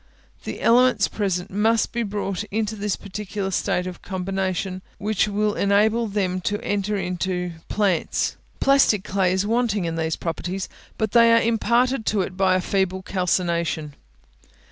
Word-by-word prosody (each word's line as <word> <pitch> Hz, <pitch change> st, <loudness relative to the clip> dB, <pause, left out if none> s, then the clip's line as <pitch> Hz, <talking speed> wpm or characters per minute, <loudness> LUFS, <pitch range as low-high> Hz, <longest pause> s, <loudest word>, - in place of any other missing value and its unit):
The -, -, -5 dB
elements 245 Hz, -3 st, +4 dB
present 195 Hz, -3 st, -2 dB
must 220 Hz, +3 st, +2 dB
be 235 Hz, -, -2 dB
brought 200 Hz, -2 st, -3 dB
into 215 Hz, +1 st, -2 dB
that 205 Hz, -1 st, -2 dB
peculiar 200 Hz, 0 st, -4 dB
state 180 Hz, -1 st, 0 dB
of 180 Hz, -1 st, -7 dB
combination 190 Hz, 0 st, -3 dB, 0.2 s
which 210 Hz, 0 st, 0 dB
will 210 Hz, 0 st, 0 dB
enable 215 Hz, +4 st, +2 dB
them 190 Hz, -3 st, -1 dB
to 205 Hz, +3 st, -1 dB
enter 205 Hz, 0 st, -1 dB
into 180 Hz, -1 st, -2 dB, 0.2 s
plants. 195 Hz, -6 st, 0 dB, 0.2 s
Plastic 275 Hz, -8 st, +4 dB
clay 190 Hz, -2 st, +1 dB
is 190 Hz, +2 st, +1 dB
wanting 220 Hz, -4 st, +1 dB
in 165 Hz, 0 st, -3 dB
these 160 Hz, -1 st, -1 dB
properties; 180 Hz, +3 st, -4 dB, 0.3 s
but 220 Hz, -2 st, -1 dB
they 230 Hz, 0 st, +6 dB
are 230 Hz, -, +5 dB
imparted 235 Hz, +2 st, +1 dB
to 205 Hz, -2 st, +2 dB
it 185 Hz, 0 st, -4 dB
by 190 Hz, -1 st, +3 dB
a 185 Hz, -, +1 dB
feeble 190 Hz, -1 st, -1 dB
calcination. 170 Hz, -5 st, -1 dB
195 Hz, 150 wpm, -23 LUFS, 185-215 Hz, 0.3 s, they